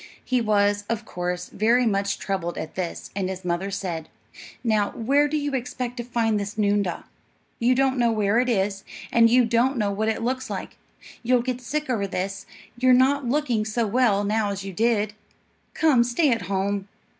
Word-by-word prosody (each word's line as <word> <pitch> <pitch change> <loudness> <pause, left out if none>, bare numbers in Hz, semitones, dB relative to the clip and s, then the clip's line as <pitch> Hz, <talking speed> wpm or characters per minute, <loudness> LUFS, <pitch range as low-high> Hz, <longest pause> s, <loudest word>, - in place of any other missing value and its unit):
He 255 -1 +1
was, 205 -2 +2
of 230 -1 -2
course, 180 -1 -4
very 235 +4 +2
much 200 -2 0
troubled 185 -3 -3
at 155 - -5
this; 180 -3 -5
and 190 -2 -1
his 190 -1 -6
mother 175 +3 -1
said, 175 -5 -4 0.5
"Now, 215 -3 +2
where 280 +6 +2
do 305 +1 -1
you 290 -1 -2
expect 250 -1 -3
to 240 - -3
find 230 -3 0
this 205 +1 -5
noondah? 205 -3 0 0.6
You 245 +2 +3
don't 265 0 +2
know 235 -1 +3
where 215 0 +2
it 255 0 +1
is, 195 -3 0 0.3
and 230 -1 +5
you 245 +1 +5
don't 240 +4 +2
know 205 -3 +1
what 215 +2 0
it 220 - -2
looks 255 +2 -2
like. - - -5 0.5
You'll 245 0 +2
get 250 0 -3
sick 300 +5 -3
over 220 -6 -1
this; 195 +1 -4 0.3
you're 255 0 +5
not 265 0 +3
looking 255 -6 +1
so 220 +2 -1
well 215 -2 +2
now 210 0 0
as 200 -1 -4
you 195 - -6
did. 215 0 +1 0.6
Come, 295 -7 +4
stay 250 +5 +2
at 220 -6 -1
home." 200 0 -1
220 Hz, 190 wpm, -24 LUFS, 200-250 Hz, 0.6 s, and